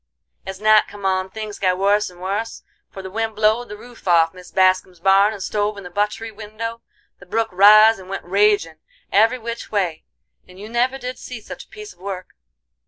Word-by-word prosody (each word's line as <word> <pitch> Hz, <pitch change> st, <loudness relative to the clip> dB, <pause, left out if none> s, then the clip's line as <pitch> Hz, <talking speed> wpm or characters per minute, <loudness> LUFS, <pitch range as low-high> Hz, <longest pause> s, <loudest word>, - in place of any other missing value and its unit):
As 190 Hz, 0 st, -6 dB
night 215 Hz, 0 st, +5 dB
come 205 Hz, -1 st, -10 dB
on 190 Hz, 0 st, 0 dB
things 215 Hz, 0 st, -7 dB
got 185 Hz, -1 st, +1 dB
wuss 205 Hz, +2 st, +2 dB
and 180 Hz, -1 st, -17 dB
wuss, 200 Hz, +5 st, -4 dB, 0.3 s
for 195 Hz, -, -10 dB
the 190 Hz, -, -8 dB
wind 225 Hz, +1 st, -2 dB
blowed 220 Hz, +3 st, +1 dB
the 210 Hz, -, -8 dB
roof 240 Hz, -2 st, -14 dB
off 165 Hz, -2 st, +4 dB
Mis 180 Hz, -1 st, -13 dB
Bascum's 185 Hz, -1 st, +2 dB
barn 195 Hz, +3 st, +4 dB
and 205 Hz, -3 st, -7 dB
stove 210 Hz, 0 st, -1 dB
in 200 Hz, -, -8 dB
the 180 Hz, -, -10 dB
butt'ry 210 Hz, +3 st, -2 dB
window; 220 Hz, +2 st, -7 dB, 0.4 s
the 180 Hz, -, -15 dB
brook 225 Hz, +3 st, -1 dB
riz 215 Hz, +3 st, +7 dB
and 185 Hz, 0 st, -13 dB
went 195 Hz, -, -5 dB
ragin' 195 Hz, -4 st, +2 dB, 0.3 s
every 225 Hz, +5 st, +4 dB
which 235 Hz, 0 st, -7 dB
way, 185 Hz, -7 st, -1 dB, 0.4 s
and 185 Hz, +1 st, -15 dB
you 210 Hz, +2 st, -9 dB
never 245 Hz, +3 st, 0 dB
did 250 Hz, -1 st, -6 dB
see 250 Hz, -2 st, -8 dB
such 215 Hz, -, -10 dB
a -, -, -39 dB
piece 425 Hz, -3 st, -10 dB
of -, -, -32 dB
work. 185 Hz, -1 st, -6 dB
205 Hz, 205 wpm, -21 LUFS, 185-220 Hz, 0.4 s, riz